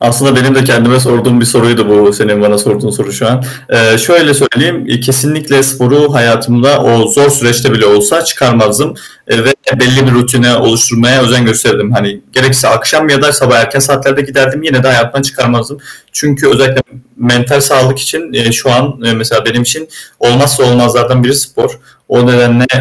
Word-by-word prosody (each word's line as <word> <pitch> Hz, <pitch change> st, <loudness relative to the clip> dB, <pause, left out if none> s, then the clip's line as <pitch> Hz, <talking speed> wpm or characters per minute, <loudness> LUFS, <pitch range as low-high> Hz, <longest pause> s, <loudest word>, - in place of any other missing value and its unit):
Aslında 125 Hz, +3 st, +1 dB
benim 135 Hz, +1 st, +1 dB
de 135 Hz, -1 st, +1 dB
kendime 120 Hz, 0 st, +2 dB
sorduğum 120 Hz, -1 st, +1 dB
bir 115 Hz, -, 0 dB
soruydu 115 Hz, -2 st, +1 dB
bu 105 Hz, -1 st, +3 dB
senin 105 Hz, 0 st, -1 dB
bana 105 Hz, 0 st, +1 dB
sorduğun 105 Hz, -, -2 dB
soru -, -, -5 dB
şu -, -, -4 dB
an. 130 Hz, +2 st, -2 dB, 0.3 s
Eee, 115 Hz, 0 st, +3 dB
şöyle 155 Hz, +3 st, +2 dB
söyleyeyim, 140 Hz, +5 st, -1 dB
eee, 120 Hz, -, -3 dB
kesinlikle 140 Hz, +2 st, 0 dB
sporu 135 Hz, +2 st, +1 dB
hayatımda 120 Hz, +4 st, +1 dB
o 115 Hz, -1 st, +1 dB
zor 140 Hz, 0 st, +3 dB
süreçte 120 Hz, -5 st, +1 dB
bile 115 Hz, 0 st, +1 dB
olsa 105 Hz, +11 st, +2 dB
çıkarmazdım, 115 Hz, -9 st, 0 dB, 0.4 s
eee, 115 Hz, -, +1 dB
ve 135 Hz, -, +3 dB, 0.3 s
belli 130 Hz, +2 st, +2 dB
bir -, -, +1 dB
rutini 120 Hz, 0 st, +1 dB
oluşturmaya 120 Hz, +3 st, +2 dB
özen 125 Hz, 0 st, +1 dB
gösterirdim. 110 Hz, -1 st, 0 dB
Hani, 100 Hz, -3 st, -3 dB
gerekirse 130 Hz, +1 st, +1 dB
akşam 155 Hz, +7 st, 0 dB
ya 140 Hz, -1 st, +1 dB
da 150 Hz, 0 st, +2 dB
sabah 130 Hz, -4 st, +2 dB
erken 135 Hz, +4 st, -1 dB
saatlerde 135 Hz, 0 st, 0 dB
giderdim, 140 Hz, +1 st, -2 dB
yine 135 Hz, -6 st, 0 dB
de 130 Hz, -, +1 dB
hayatımdan 120 Hz, +2 st, 0 dB
çıkarmazdım. 130 Hz, -1 st, -3 dB, 0.3 s
Çünkü 145 Hz, 0 st, -1 dB
özellikle 130 Hz, +1 st, +1 dB, 0.4 s
mental 120 Hz, +4 st, 0 dB
sağlık 135 Hz, -1 st, +1 dB
için, 140 Hz, +5 st, -5 dB
eee, 115 Hz, 0 st, -1 dB
şu 125 Hz, +3 st, -1 dB
an 130 Hz, +1 st, -2 dB
eee 115 Hz, -, +1 dB
mesela 110 Hz, 0 st, -2 dB
benim 120 Hz, +1 st, -1 dB
için 155 Hz, +6 st, -3 dB, 0.3 s
olmazsa 140 Hz, +4 st, +1 dB
olmazlardan 120 Hz, 0 st, +1 dB
biri 135 Hz, +3 st, 0 dB
spor. 135 Hz, -3 st, -3 dB, 0.3 s
O 120 Hz, 0 st, +1 dB
nedenle 120 Hz, 0 st, +2 dB
125 Hz, 175 wpm, -8 LUFS, 120-135 Hz, 0.4 s, bu